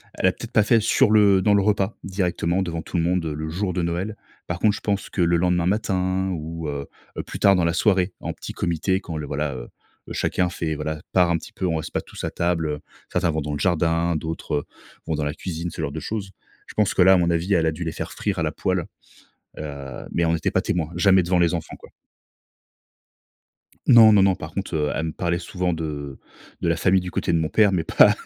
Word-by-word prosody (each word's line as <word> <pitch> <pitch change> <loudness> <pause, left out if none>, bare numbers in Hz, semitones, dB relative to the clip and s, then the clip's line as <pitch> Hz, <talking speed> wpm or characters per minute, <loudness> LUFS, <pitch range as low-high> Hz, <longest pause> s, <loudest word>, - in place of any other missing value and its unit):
elle - - -1
a - - +4
peut-être - - -9
pas 105 - +4
fait 115 +1 +4
sur 110 - +3
le 100 -3 +5
dans 105 +1 +3
le 100 - +4
repas, 100 0 0
directement 90 -1 -1
devant 85 -3 -3
tout 90 - -4
le 85 - +2
monde, 90 0 +1
heu, 80 - -2
le 80 +1 -4
jour 90 +2 -2
de 90 - -1
Noël. 90 +5 -2 0.3
Par 85 0 -3
contre, 105 0 +3
je - - -8
pense 100 -1 -2
que 95 - -2
le 85 0 +3
lendemain 90 0 +1
matin 95 -1 0
ou 80 -1 -5
heu 70 -1 -4 0.3
heu, - - -2
plus - - -8
tard 100 -1 +5
dans 90 - +1
la 85 - +2
soirée, 95 0 +2
en - - -4
petit - - -8
comité 90 +3 0
quand 85 - -7
le 75 - -4
voilà, 75 -1 -2
heu, - - -8 0.4
chacun 90 -1 0
fait, 80 -2 -3
voilà, 75 0 -4
part 90 -2 +4
un 85 - +2
petit - - -12
peu, 95 - -3
on 85 -3 +1
reste 80 - -5
pas - - 0
tous - - -10
à - - -3
table, 85 -1 0
heu, 75 -1 -3 0.3
certains 85 - +1
vont 80 - -1
dans 75 +1 -4
le 70 - -3
jardin 85 -1 +1
d'autres, 80 -1 -4
heu, 75 - -1 0.4
vont 80 - 0
dans 75 - -2
la 75 - -1
cuisine, 85 0 -5
ce 80 - -6
genre 70 -2 -3
de 80 - -5
choses. 100 -3 -4 0.4
Je - - -11
pense 105 -2 +1
que - - +2
là, 95 +1 +7
à 95 - +5
mon 85 -1 +2
avis, 85 +4 0
elle 85 -3 +3
a - - +2
dû 80 +2 -5
les 80 - -2
faire - - -5
frire - - -2
à - - 0
la - - 0
poêle. - - -1 0.7
Heu, 70 -4 -7
mais 85 - +1
on 80 - +2
n'était 80 - 0
pas - - +2
témoin, 80 -3 -1
jamais 95 +1 +5
devant 90 +1 +1
les 85 0 +3
enfants, 85 -2 -4
quoi. - - -15 2.0
Non, 110 -2 +8
non, 100 - +6
non, 95 -1 +4
par 80 -3 -8
contre, 100 -3 -4
heu, 75 -1 0
elle 80 - -1
me 80 - -3
parlait 85 +1 -1
souvent 90 0 -2
de 75 -4 -5 0.4
de - - 0
la - - +2
famille 95 0 +3
du 90 0 -6
côté 85 - -1
de 85 - +3
mon 80 -1 0
père, 105 -2 +4
mais 90 -3 +1
pas - - +6
85 Hz, 255 wpm, -23 LUFS, 80-95 Hz, 2.0 s, Non